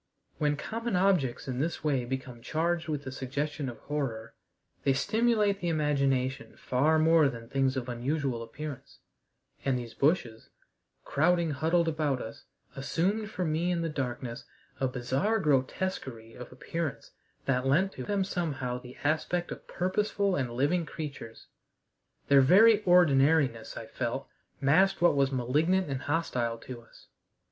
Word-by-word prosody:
When 150 Hz, -1 st, +1 dB
common 230 Hz, +5 st, -3 dB
objects 180 Hz, -11 st, +1 dB
in 130 Hz, -1 st, -3 dB
this 165 Hz, +4 st, -2 dB
way 135 Hz, -5 st, +1 dB
become 125 Hz, -1 st, -5 dB
charged 165 Hz, +6 st, -1 dB
with 150 Hz, -2 st, -2 dB
the 130 Hz, -, -6 dB
suggestion 140 Hz, +2 st, -3 dB
of 120 Hz, -, -8 dB
horror, 125 Hz, -7 st, -4 dB, 0.5 s
they 135 Hz, -, +3 dB
stimulate 215 Hz, -, +2 dB
the 175 Hz, -, -1 dB
imagination 135 Hz, -6 st, 0 dB
far 150 Hz, +5 st, +2 dB
more 160 Hz, -2 st, +5 dB
than 115 Hz, -2 st, -8 dB
things 135 Hz, +1 st, 0 dB
of 125 Hz, -1 st, -3 dB
unusual 125 Hz, 0 st, -2 dB
appearance; 145 Hz, +5 st, -8 dB, 0.7 s
and 135 Hz, -2 st, +1 dB
these 120 Hz, -2 st, -7 dB
bushes, 135 Hz, -7 st, 0 dB, 0.6 s
crowding 170 Hz, +2 st, +2 dB
huddled 165 Hz, +4 st, +1 dB
about 150 Hz, -4 st, 0 dB
us, 110 Hz, -1 st, -8 dB, 0.3 s
assumed 195 Hz, +10 st, -1 dB
for 185 Hz, -4 st, -3 dB
me 160 Hz, +3 st, 0 dB
in 170 Hz, -2 st, 0 dB
the 165 Hz, -, -1 dB
darkness 125 Hz, -4 st, -4 dB, 0.3 s
a 135 Hz, -, +1 dB
bizarre 130 Hz, -, 0 dB
grotesquerie 130 Hz, -, -1 dB
of 125 Hz, -, -10 dB
appearance 155 Hz, +4 st, -5 dB, 0.3 s
that 130 Hz, -1 st, +1 dB
lent 185 Hz, +9 st, +3 dB
to 130 Hz, -, -7 dB
them 200 Hz, +6 st, 0 dB
somehow 140 Hz, -10 st, -2 dB
the 125 Hz, 0 st, -12 dB
aspect 160 Hz, +4 st, 0 dB
of -, -, -8 dB
purposeful 200 Hz, +1 st, 0 dB
and 130 Hz, -4 st, -1 dB
living 145 Hz, +7 st, +1 dB
creatures. 140 Hz, -7 st, -8 dB, 0.8 s
Their 140 Hz, -1 st, +6 dB
very 205 Hz, +9 st, +6 dB
ordinariness, 145 Hz, -8 st, +3 dB
I 115 Hz, -, -6 dB
felt, 125 Hz, +4 st, -4 dB, 0.3 s
masked 185 Hz, +8 st, +3 dB
what 175 Hz, -3 st, +4 dB
was 135 Hz, -1 st, +2 dB
malignant 150 Hz, +8 st, +1 dB
and 135 Hz, -1 st, -3 dB
hostile 125 Hz, -7 st, -1 dB
to 120 Hz, +1 st, -9 dB
us. 115 Hz, -, -19 dB
140 Hz, 145 wpm, -29 LUFS, 130-170 Hz, 0.8 s, Their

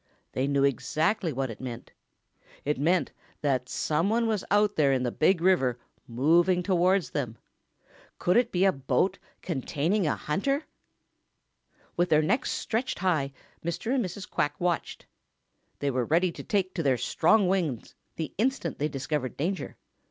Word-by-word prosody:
They 130 Hz, +2 st, -1 dB
knew 140 Hz, -1 st, +2 dB
exactly 160 Hz, -, +1 dB
what 135 Hz, -2 st, -2 dB
it 110 Hz, -, -10 dB
meant. 120 Hz, -3 st, -7 dB, 0.7 s
It 150 Hz, -1 st, 0 dB
meant 170 Hz, +4 st, +2 dB, 0.3 s
that 130 Hz, -3 st, 0 dB
some 160 Hz, +5 st, 0 dB
one 230 Hz, +2 st, +2 dB
was 215 Hz, -4 st, 0 dB
out 205 Hz, 0 st, +3 dB
there 145 Hz, -3 st, +3 dB
in 130 Hz, -2 st, +1 dB
the 120 Hz, -, 0 dB
Big 165 Hz, +5 st, +2 dB
River 150 Hz, -10 st, +3 dB, 0.3 s
moving 170 Hz, +9 st, +3 dB
towards 185 Hz, -3 st, +2 dB
them. 120 Hz, -6 st, -3 dB, 0.8 s
Could 180 Hz, -, +1 dB
it 240 Hz, 0 st, +3 dB
be 185 Hz, +1 st, +2 dB
a 195 Hz, -, +5 dB
boat 135 Hz, +6 st, 0 dB, 0.2 s
containing 165 Hz, +4 st, 0 dB
a -, -, +1 dB
hunter? 275 Hz, -, -1 dB, 1.3 s
With 175 Hz, +1 st, +2 dB
their 155 Hz, -1 st, +4 dB
necks 245 Hz, -, +1 dB
stretched 230 Hz, +4 st, -2 dB
high, 155 Hz, -7 st, 0 dB, 0.3 s
Mr. 170 Hz, +9 st, -2 dB
and 265 Hz, -3 st, +2 dB
Mrs. 185 Hz, +1 st, -6 dB
Quack 145 Hz, 0 st, -1 dB
watched. 175 Hz, -3 st, -2 dB, 0.7 s
They 140 Hz, -1 st, -1 dB
were 125 Hz, -2 st, 0 dB
ready 170 Hz, +5 st, +2 dB
to -, -, -9 dB
take 190 Hz, -2 st, 0 dB
to 170 Hz, -, -2 dB
their 135 Hz, -5 st, +2 dB
strong 195 Hz, -, +3 dB
wings 170 Hz, -, -1 dB, 0.2 s
the 160 Hz, -, -4 dB
instant 245 Hz, -, 0 dB
they 150 Hz, -, +1 dB
discovered 135 Hz, -1 st, -3 dB
danger. 180 Hz, +7 st, -3 dB
165 Hz, 160 wpm, -28 LUFS, 140-190 Hz, 1.3 s, a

